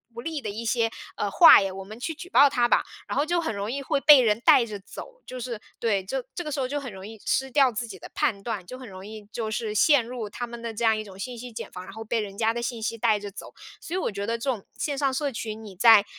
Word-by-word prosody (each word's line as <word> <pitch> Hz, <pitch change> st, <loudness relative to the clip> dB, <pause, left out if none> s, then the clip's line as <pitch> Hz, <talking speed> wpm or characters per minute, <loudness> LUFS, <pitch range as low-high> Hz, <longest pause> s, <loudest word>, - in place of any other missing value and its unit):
不 235 Hz, -, -6 dB
利 320 Hz, -1 st, -4 dB
的 210 Hz, -, -4 dB
一 220 Hz, +3 st, -5 dB
些， 230 Hz, 0 st, +1 dB, 0.3 s
呃， 205 Hz, -, -1 dB
话 330 Hz, -, +9 dB
呀， 195 Hz, -1 st, -2 dB
我 195 Hz, 0 st, -7 dB
们 215 Hz, +4 st, -11 dB
去 325 Hz, +5 st, -4 dB
举 350 Hz, -, -9 dB
报 285 Hz, -6 st, +6 dB
他 240 Hz, -2 st, +2 dB
吧！” -, -, +3 dB, 0.2 s
然 -, -, -3 dB
后 285 Hz, -, +3 dB
就 345 Hz, +2 st, 0 dB
很 320 Hz, -8 st, -2 dB
容 200 Hz, +3 st, -3 dB
易 275 Hz, +1 st, -3 dB
会 275 Hz, -, 0 dB
被 295 Hz, -2 st, +9 dB
人 220 Hz, -1 st, +2 dB
带 245 Hz, -, +6 dB
着 210 Hz, -3 st, -7 dB
走， -, -, -11 dB
就 255 Hz, -, -7 dB
是 235 Hz, -3 st, -5 dB, 0.2 s
对， 205 Hz, -4 st, +1 dB
就 255 Hz, +7 st, -3 dB
这 350 Hz, -, -4 dB
个 300 Hz, -, -5 dB
时 280 Hz, -, -2 dB
候 255 Hz, -, 0 dB
就 290 Hz, +3 st, -2 dB
很 260 Hz, -, -7 dB
容 190 Hz, +1 st, -9 dB
易 220 Hz, -2 st, -11 dB
失 265 Hz, 0 st, 0 dB
掉 270 Hz, -2 st, +4 dB
自 230 Hz, +2 st, -4 dB
己 190 Hz, -4 st, -10 dB
的 -, -, -10 dB
判 240 Hz, -10 st, 0 dB
断， 210 Hz, -4 st, -4 dB
就 255 Hz, +8 st, -9 dB
很 255 Hz, -4 st, -10 dB
容 190 Hz, 0 st, -10 dB
易 215 Hz, 0 st, -9 dB
就 220 Hz, -2 st, -3 dB
是 215 Hz, -1 st, -3 dB
陷 285 Hz, +3 st, +5 dB
入 240 Hz, -3 st, -5 dB
他 240 Hz, +3 st, -5 dB
们 235 Hz, 0 st, -8 dB
的 230 Hz, -1 st, -5 dB
这 235 Hz, -, -4 dB
样 220 Hz, -1 st, +4 dB
一 215 Hz, -, -4 dB
种 195 Hz, -2 st, -13 dB
信 245 Hz, +3 st, -5 dB
息 245 Hz, +1 st, -8 dB
茧 230 Hz, -, -7 dB
房， 180 Hz, 0 st, -8 dB
然 195 Hz, -, -11 dB
后 220 Hz, -, -7 dB
被 225 Hz, +1 st, -1 dB
人 200 Hz, -2 st, -5 dB
家 225 Hz, -1 st, +2 dB
的 235 Hz, -, -3 dB
信 235 Hz, -1 st, -3 dB
息 230 Hz, +1 st, -2 dB
带 220 Hz, -2 st, +2 dB
着 205 Hz, -, -6 dB
走。 195 Hz, -, -10 dB, 0.3 s
所 335 Hz, -, -8 dB
以 -, -, +1 dB
我 300 Hz, -, -1 dB
觉 200 Hz, 0 st, -4 dB
得 230 Hz, +2 st, -1 dB
这 270 Hz, +4 st, -2 dB
种 225 Hz, -7 st, -2 dB
线 285 Hz, -2 st, -2 dB
上 275 Hz, -2 st, +1 dB
社 280 Hz, +1 st, -1 dB
群， 220 Hz, -1 st, -6 dB
你 200 Hz, -3 st, -10 dB
在 210 Hz, +1 st, +7 dB
230 Hz, 330 characters per minute, -26 LUFS, 210-260 Hz, 0.3 s, 话